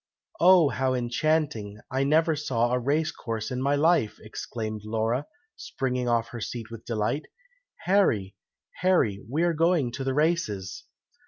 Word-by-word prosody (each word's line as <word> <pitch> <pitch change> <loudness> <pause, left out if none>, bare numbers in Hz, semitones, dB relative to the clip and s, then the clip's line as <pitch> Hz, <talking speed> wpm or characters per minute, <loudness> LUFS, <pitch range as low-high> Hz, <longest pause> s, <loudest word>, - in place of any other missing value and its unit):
"Oh, 175 -3 +6
how 130 -1 0
enchanting! 125 -4 -1
I 130 +1 +1
never 160 +3 +3
saw 120 -5 0
a 125 - +2
race 150 +5 0
course 110 -1 -5
in 125 0 -2
my 140 +2 +2
life!" 150 -7 +2
exclaimed 110 0 -5
Laura, 115 +5 -1 0.3
springing 125 -2 -2
off 115 -1 +1
her 120 -1 -7
seat 115 +1 -5
with 115 -1 -9
delight. 115 +5 -2 0.5
"Harry! 120 - +2 0.4
Harry! 135 - +2
we 155 +6 0
are 175 -1 +2
going 165 -5 +2
to 135 +3 -5
the 135 0 -1
races!" 110 - -1
125 Hz, 150 wpm, -26 LUFS, 115-155 Hz, 0.5 s, Oh